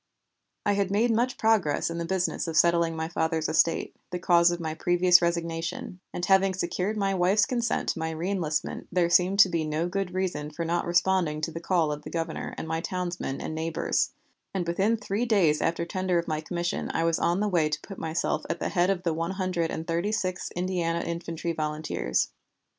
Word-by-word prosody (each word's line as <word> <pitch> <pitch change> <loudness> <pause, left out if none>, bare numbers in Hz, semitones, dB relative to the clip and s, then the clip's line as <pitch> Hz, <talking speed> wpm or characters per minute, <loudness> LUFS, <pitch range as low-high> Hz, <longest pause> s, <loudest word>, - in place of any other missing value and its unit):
I 205 - +3
had 200 -1 0
made 220 +4 +2
much 240 +3 +1
progress 205 -9 +2
in 170 - -4
the 170 - -2
business 180 0 -1
of 160 -1 -2
settling 170 0 +4
my 160 0 -2
father's 160 -1 -1
estate, 165 +1 +1
the 180 - -3
cause 175 -1 +4
of 175 0 -2
my 160 -2 -3
previous 175 +2 +4
resignation, 170 +1 -2
and 175 - -3
having 195 0 +4
secured 185 +4 -2
my 195 -1 +1
wife's 190 +3 +3
consent 240 -2 -1
to - - -1
my 160 0 -2
reënlistment, 160 -2 -2
there 175 -1 +2
seemed 185 +3 +4
to 195 - +6
be 165 -2 0
no 155 +2 -1
good 190 0 -3
reason 175 -6 -2
for 165 +2 -4
not 170 +1 0
responding 175 -3 +2
to 160 - -2
the 165 - -5
call 170 -3 +1
of 150 0 -4
the - - -8
Governor 165 -1 -4
and - - -5
my 160 +1 -1
townsmen 175 -6 -3
and - - -4
neighbors, 160 +1 0 0.5
and 180 -2 0
within 195 +7 +2
three 210 +3 -2
days 175 -9 +3
after 170 +1 0
tender 185 +1 0
of 170 - -1
my 155 -1 -1
commission 175 +1 -3
I 165 - +1
was 165 -1 +1
on 175 +2 +1
the 210 - +1
way 170 -6 +2
to 155 0 -2
put 195 - -9
myself 160 +1 -1
at - - -1
the - - -1
head 180 -1 +2
of 185 -2 0
the 170 -3 +1
One 165 +1 -2
Hundred 185 -3 -1
and 160 - -4
Thirty 170 +5 -1
sixth 185 -4 -2
Indiana 175 -2 -1
Infantry 170 0 -3
Volunteers. 155 - -1
170 Hz, 210 wpm, -27 LUFS, 165-185 Hz, 0.5 s, to